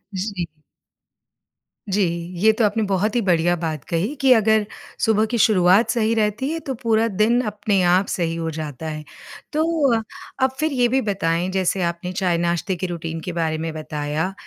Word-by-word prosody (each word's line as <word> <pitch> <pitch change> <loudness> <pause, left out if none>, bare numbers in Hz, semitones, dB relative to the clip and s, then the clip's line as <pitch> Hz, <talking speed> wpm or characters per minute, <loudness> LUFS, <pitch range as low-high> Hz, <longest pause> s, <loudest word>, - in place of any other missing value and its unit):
जी। 190 -2 -3 1.4
जी, 200 +2 +1 0.4
ये 220 +4 +5
तो 220 0 +2
आपने 215 +2 +1
बहुत 200 +3 0
ही 240 - +3
बढ़िया 175 -3 +2
बात 155 -4 -3
कही 175 - -1
कि 265 -1 +5
अगर 220 -2 +3 0.4
सुबह 220 -1 +3
की 235 - 0
शुरुआत 195 0 +4
सही 225 -2 +1
रहती 220 +5 0
है 330 - -2
तो 270 - -1
पूरा 225 0 +2
दिन 220 +3 +2
अपने 205 -2 0
आप 185 +2 +3
सही 165 -2 -1
हो 165 -1 -3
जाता 155 -1 -6
है। 155 0 -6 0.5
तो 310 +1 +2 0.8
अब 260 - +3
फिर 310 0 +1
ये 245 -3 +2
भी 265 +2 +1
बताएँ 185 -4 -1
जैसे 190 0 0
आपने 170 +1 -3
चाय-नाश्ते 175 0 0
के 180 +1 -3
रुटीन 165 -1 -5
के 180 - -5
बारे 160 -2 -1
में 160 +1 -3
बताया, 155 +3 -3
190 Hz, 175 wpm, -22 LUFS, 170-220 Hz, 1.4 s, ये